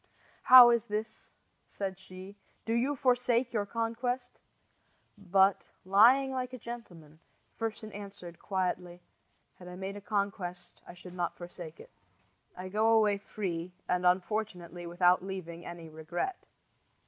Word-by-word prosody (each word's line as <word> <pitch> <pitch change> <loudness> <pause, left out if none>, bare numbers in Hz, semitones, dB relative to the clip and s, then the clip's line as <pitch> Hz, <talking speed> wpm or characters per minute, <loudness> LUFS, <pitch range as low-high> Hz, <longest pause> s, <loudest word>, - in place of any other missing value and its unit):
"How 250 -2 +10
is 235 -2 +1
this?" 215 +1 -5 0.4
said 190 -2 -5
she. 190 +1 -11 0.3
"Do 225 - -1
you 255 +5 +1
forsake 245 -2 +1
your 205 -3 -1
conquest?" 235 +3 -3 0.8
But, 195 -1 +2 0.2
"lying 240 +8 +5
like 255 -1 -3
a - - -5
gentleman," 175 -11 -10 0.4
Fersen 220 -1 -4
answered, 195 -4 -9
quietly: 180 -2 -3 0.6
"Had 180 - -11
I 180 - -8
made 190 +2 -5
a 205 - -8
conquest 200 -4 -4
I 175 - -10
should 180 0 -12
not 175 -1 -3
forsake 175 -2 -9
it. - - -14 0.7
I 185 +1 -6
go 215 +4 +2
away 210 -2 +3
free, 180 -4 -5
and, 180 0 0
unfortunately, 180 -2 -1
without 180 +1 +3
leaving 180 -3 -7
any 170 -1 -8
regret." 160 - -5
195 Hz, 135 wpm, -30 LUFS, 180-225 Hz, 0.8 s, How